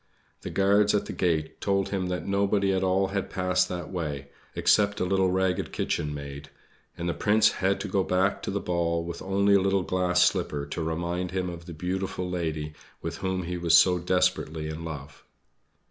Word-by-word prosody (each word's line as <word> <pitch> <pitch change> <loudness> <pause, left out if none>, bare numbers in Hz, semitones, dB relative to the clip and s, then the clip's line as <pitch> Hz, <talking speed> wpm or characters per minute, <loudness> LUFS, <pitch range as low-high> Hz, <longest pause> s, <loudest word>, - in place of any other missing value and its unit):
The - - -5
guards 100 +1 +3
at 105 - 0
the - - -6
gate 80 -4 -1
told 100 -1 +1
him 95 -2 -1
that 90 -3 -3
nobody 100 0 +1
at 95 - +1
all 95 +1 +2
had 100 0 -2
passed 90 -1 +1
that 90 -2 -5
way, 75 -6 -4 0.3
except 105 -1 +3
a - - +1
little 95 0 +2
ragged 95 -1 0
kitchenmaid; 70 -1 -3 0.5
and 85 0 -3
the 85 - 0
Prince 105 0 +3
had 95 +1 0
to 105 - -3
go 95 - +1
back 95 +2 +1
to - - -4
the 100 - -1
ball 85 -2 -1
with 85 0 -6
only 100 +1 +2
a 100 - +5
little 95 0 +1
glass 90 0 +2
slipper 70 -4 -1
to 70 - -5
remind 85 +3 -2
him 90 0 -2
of 85 0 -10
the 85 - -7
beautiful 90 +2 -3
lady 80 -4 -3 0.3
with 85 +1 -4
whom 95 -1 -2
he 90 +1 -4
was 85 -1 +5
so 90 -1 +5
desperately 90 -3 0
in 80 +1 -6
love. 75 -2 -8
90 Hz, 190 wpm, -27 LUFS, 85-95 Hz, 0.5 s, a